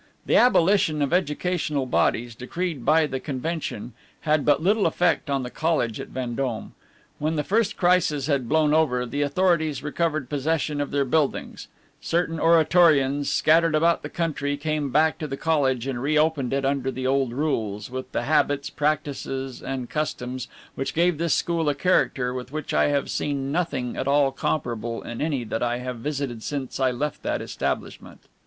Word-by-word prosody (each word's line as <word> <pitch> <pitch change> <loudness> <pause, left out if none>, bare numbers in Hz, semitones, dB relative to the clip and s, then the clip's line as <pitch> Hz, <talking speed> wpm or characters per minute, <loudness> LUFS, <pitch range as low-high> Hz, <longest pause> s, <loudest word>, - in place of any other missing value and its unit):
The - - +2
abolition 180 -9 +4
of 140 - -1
educational 155 -4 0
bodies, 120 -1 +1
decreed 145 +4 -4
by 160 +3 +4
the 135 -3 -3
convention, 140 -4 -4 0.3
had 155 -1 +1
but 145 -1 +3
little 200 +6 +2
effect 175 -4 +1
on 135 -2 0
the 125 - -6
college 155 -9 0
at - - -6
Vendome. 125 -2 -4 0.5
When 155 +2 -1
the 150 - 0
first 220 +3 +1
crisis 175 -6 +2
had 135 -5 0
blown 155 -1 +3
over, 130 -6 +2
the 140 +5 -3
authorities 155 -2 +1
recovered 155 -2 -1
possession 150 +1 -1
of 145 - -2
their 140 -1 0
buildings; 150 +1 -1 0.3
certain 165 -1 -1
Oratorians, 155 -4 +4
scattered 165 0 +3
about 165 +2 +3
the - - -6
country, 145 -4 -2
came 150 -1 -2
back 155 +4 +2
to 155 - -3
the 135 -1 -5
college 135 -6 +1
and 130 -3 -3
re 150 +3 +1
opened 150 -5 +1
it 135 0 0
under 135 -1 0
the 130 0 -4
old 135 -1 +1
rules, 115 -6 -2
with 130 0 -6
the - - -1
habits, 145 -1 +1
practices, 140 -3 -2
and 130 -2 -4
customs 130 -4 -3 0.3
which 135 0 -4
gave 170 -1 +2
this 170 -1 +2
school 165 -3 0
a 145 - 0
character 130 -8 +1
with 125 0 -6
which 155 -1 -4
I - - +3
have 145 -1 0
seen 140 -2 -2
nothing 140 -7 -2
at 130 - -3
all 140 -1 +3
comparable 120 -5 -3
in 120 0 -6
any 145 -5 -1
that 115 0 -3
I 120 0 0
have 125 0 -5
visited 135 -3 -3
since 135 +1 -4
I 130 -1 +3
left 145 +4 -3
that - - -1
establishment. - - -4
145 Hz, 175 wpm, -24 LUFS, 130-160 Hz, 0.5 s, abolition